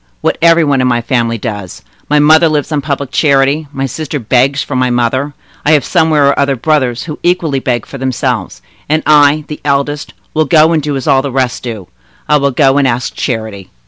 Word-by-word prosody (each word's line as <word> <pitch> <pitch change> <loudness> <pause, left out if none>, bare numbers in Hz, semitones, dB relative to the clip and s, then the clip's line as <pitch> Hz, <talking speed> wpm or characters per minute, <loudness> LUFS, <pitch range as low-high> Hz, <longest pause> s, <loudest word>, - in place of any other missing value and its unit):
What - - -1
every 165 0 +5
one 140 -3 +1
in 130 - +1
my 120 -1 +1
family 115 -1 -1
does. 105 -5 -6 0.3
My 150 - +3
mother 155 +3 +5
lives 150 0 -2
on 150 -2 0
public 140 -1 -4
charity, 140 +1 +1
my 135 -1 -3
sister 150 +3 -4
begs 130 +3 +1
for 140 - -6
my 130 0 +1
mother; 125 +4 -1 0.3
I 155 - +3
have, 150 - +2
somewhere 160 -4 +2
or 140 - +1
other, 140 -1 +1
brothers 130 -3 0
who 150 -2 -7
equally 175 -6 0
beg 120 -3 -2
for 135 - -10
themselves; 125 - -3 0.3
and 155 +1 +1
I, 150 0 +4
the 150 - -8
eldest, 145 +1 -2 0.2
will 155 0 +1
go 155 +2 +4
and 160 -2 +1
do 145 0 -3
as 135 - -5
all 135 -3 +3
the 140 0 -4
rest 130 -2 -1
do—I 95 - -4
will 140 -1 +1
go 135 +1 +2
and 140 - +2
ask 120 0 -2
charity!" 110 -6 -4
140 Hz, 210 wpm, -12 LUFS, 125-150 Hz, 0.3 s, every